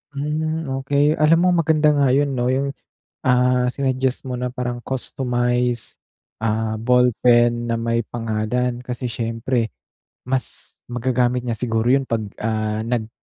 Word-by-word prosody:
Hmm, 155 +1 -2
okey. 145 +2 +2
Alam 155 +2 +5
mo - - +4
maganda 155 -1 +3
nga 145 -2 +3
'yun 145 0 +2
'no, 125 -2 0
'yung, 135 +2 0 0.5
ah, 125 0 +3
sinuggest 130 -1 0
mo 125 - -3
na 125 0 -3
parang 125 -1 -3
customized, 125 -2 -1 0.5
ah, 110 0 0
ballpen 120 0 +3
na 115 - -1
may 115 0 0
pangalan. 120 +2 -2
Kasi 125 0 -4
siyempre 115 0 -2 0.6
mas 130 0 -3
magagamit 125 0 +1
niya 115 -2 -2
siguro 115 -1 0
'yun 135 +2 +4
pag, 115 -1 0 0.2
ah, 110 -1 -1
nag 115 -2 -1
125 Hz, 135 wpm, -21 LUFS, 115-135 Hz, 0.6 s, Alam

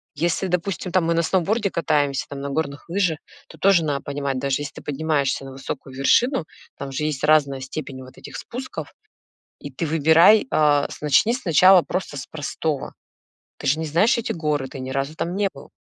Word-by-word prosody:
Если, 175 +3 0
допустим, 180 +1 -2
там, 180 -2 +2
мы 170 - +2
на 165 - +2
сноуборде 195 +5 0
катаемся, 145 -5 0
там, 140 -1 -7
на 140 - -4
горных 145 +1 -4
лыжах, 175 -4 0 0.3
то - - -14
тоже 190 -4 +4
на 140 -2 -1
понимать, 140 -2 -3
даже 140 +1 -1
если 145 -1 -6
ты - - -9
поднимаешься 145 -2 -1
на 135 - -9
высокую 135 0 -7
вершину, 210 - +2 0.3
там 140 0 -6
же 145 +3 -2
есть 150 -2 -3
разная 145 -3 +3
степень 130 0 -6
вот 130 0 -15
этих - - -11
спусков, 255 +2 -7 0.7
и 145 - -8
ты 140 +5 -4
выбирай, 165 - +5
а, 145 -2 +3
с - - -10
начни 150 - +3
сначала 185 - +5
просто 185 -5 -4
с 135 - -6
простого. 150 -1 -4 0.7
Ты - - -7
же 145 +4 +2
не 160 - -2
знаешь 175 - +3
эти 235 0 -2
горы, 150 -4 -1
ты 135 - -9
ни 130 0 -5
разу 135 +3 -2
там 175 +3 -3
не 200 -1 +1
был. - - -14
155 Hz, 195 wpm, -22 LUFS, 140-175 Hz, 0.7 s, выбирай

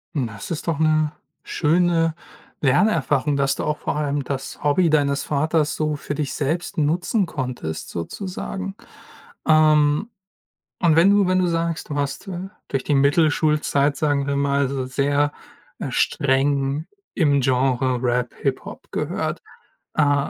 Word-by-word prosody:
Das 115 -8 -3
ist 165 0 -4
doch 160 -3 0
'ne 155 -1 +2 0.3
schöne 165 0 +2 0.5
Lernerfahrung, 150 0 +2
dass 135 -1 +1
du - - -4
auch 150 0 -1
vor - - -3
allem 145 -1 -1
das 135 +1 -5
Hobby 155 +4 +3
deines 140 -2 +2
Vaters 155 +1 0
so 155 -1 -1
für 145 0 -5
dich 150 -2 -2
selbst 160 +5 -2
nutzen 175 +7 +1
konntest 125 - -5
sozusagen. 190 - -5 0.7
Ähm, 155 +3 +4 0.7
und 170 -4 +4
wenn 170 +4 +6
du 200 -2 +4
wenn 185 0 +2
du 180 - +2
sagst, 165 -2 -2
du 145 - -3
hast, 140 +7 -3
äh- 185 +1 -5 0.2
durch 135 -1 -1
die 145 - +2
Mittelschulzeit, 145 0 +2
sagen 145 -2 +1
wir 140 - 0
mal- 140 -1 +1
so 135 -1 -2
sehr, 145 +3 +1 0.5
äh, - - -4
streng 140 +2 +1 0.3
im 145 -5 +3
Genre 130 -1 +1
Rap, 125 -1 0
Hip-Hop - - -4
gehört, - - -2 0.5
äh, 145 -2 +2
145 Hz, 140 wpm, -22 LUFS, 140-160 Hz, 0.7 s, wenn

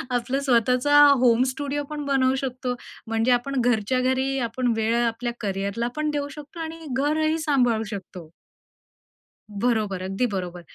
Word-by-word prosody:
आपलं 250 +3 -1
स्वतःचा 255 +2 +3 0.2
home 240 0 +4
studio 290 +1 -3
पण 295 -1 -5
बनवू 265 -1 +2
शकतो. 255 -1 -3 0.3
म्हणजे 225 +2 +1
आपण 250 +2 +1
घरच्या 245 +1 +1
घरी 260 +1 0
आपण 245 0 0
वेळ 225 +1 +1
आपल्या 235 +1 -2
कॅरियरला 200 +3 -2
पण 305 0 -1
देऊ 285 -1 -2
शकतो 300 +4 -11
आणि 325 0 -5 0.2
घरही 310 +3 +1
सांभाळू 250 -8 +2
शकतो. 180 -5 -8 1.3
बरोबर, 215 -6 0
अगदी 195 +6 0
बरोबर. 180 -2 -4
250 Hz, 140 wpm, -24 LUFS, 225-280 Hz, 1.3 s, home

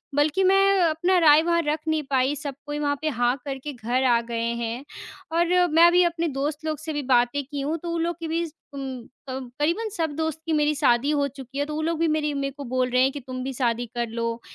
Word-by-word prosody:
बल्कि 295 +6 +2
मैं 390 +1 +4
अपना 340 +3 +2
राय 310 -2 +7
वहाँ 340 0 +2
रख 305 +1 +1
नहीं 315 -1 +1
पाई। 265 +2 +2
सब 285 -2 -5
कोई 295 0 -4
वहाँ 290 -1 0
पे 315 - 0
हाँ 245 -3 0
हाँ 245 +2 +1
करके 275 +1 -5
घर 245 +2 -1
आ - - +3
गए 230 0 -4 0.2
हैं। 230 +3 -4 0.5
और 340 0 +3 0.2
मैं 325 +2 +6
अभी 355 +1 +5
अपने 340 -1 0
दोस्त 295 +2 -3
लोग 310 -2 -2
से 315 0 -5
भी 295 -1 -2
बातें 245 +3 +3
की 285 +1 -5
हूँ 300 +4 -1
तो 340 - -3
ऊ - - -1
लोगों 340 +1 0
की 330 - -3
भी 330 +2 -1 0.3
उम, 265 -3 -6 0.2
क 260 -1 -6
करीबन 340 +10 0
सब 320 -2 0
दोस्त 320 0 -2
की 325 - -1
मेरी 300 0 +2
शादी 275 -1 +2
हो 285 -2 +1
चुकी 270 -1 -10
है, 285 - +1
तो 300 0 -5
ऊ - - -1
लोग 325 0 -1
भी 335 - +2
मेरी 305 -1 0
मेरे 275 -1 -2
को 285 - -6
बोल 255 0 0
रहे 250 +1 +3
हैं 265 - +3
कि 285 - -6
तुम 255 0 -5
भी 265 +1 -4
शादी 240 -2 0
कर 240 0 -1
लो, 230 0 -3
290 Hz, 255 wpm, -24 LUFS, 255-320 Hz, 0.5 s, राय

